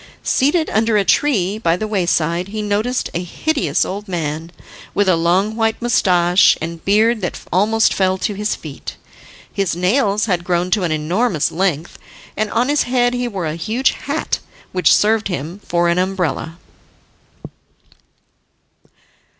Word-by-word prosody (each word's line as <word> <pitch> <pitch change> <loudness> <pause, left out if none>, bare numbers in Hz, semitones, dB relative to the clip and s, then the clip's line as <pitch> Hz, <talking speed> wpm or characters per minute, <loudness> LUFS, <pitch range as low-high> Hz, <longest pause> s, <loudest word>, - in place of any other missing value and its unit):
Seated 315 +5 +2
under 220 0 +2
a 200 - +1
tree 210 -8 +1
by 170 -5 +1
the 215 - -3
wayside 175 -3 0
he 215 +1 -4
noticed 215 +5 -1
a 170 - -2
hideous 180 - -1
old 205 +3 -6
man, 165 -2 -4 0.4
with 205 -1 +2
a 185 - +4
long 180 +6 +1
white 225 -1 0
moustache, 180 -6 +3
and 165 0 -6
beard 220 +3 +2
that 180 - -3
almost 220 +4 +3
fell 190 -1 +1
to 205 - -2
his 210 +1 -2
feet. 150 -4 -9 0.6
His 195 -4 -1
nails 200 +3 +1
had 180 -5 -1
grown 175 0 -1
to 210 - +2
an 165 - -1
enormous 165 +4 0
length, 170 -2 -2 0.4
and 215 0 -1
on 240 +4 +1
his 290 +1 +2
head 245 -1 +2
he 245 0 -1
wore 195 -7 -4
a 155 - -2
huge 220 +11 0
hat, 290 +3 -3 0.3
which 180 -1 +3
served 220 +1 +3
him 175 +1 -5
for 175 0 +1
an 170 +1 +2
umbrella. 180 -3 -2
195 Hz, 150 wpm, -18 LUFS, 175-220 Hz, 0.6 s, a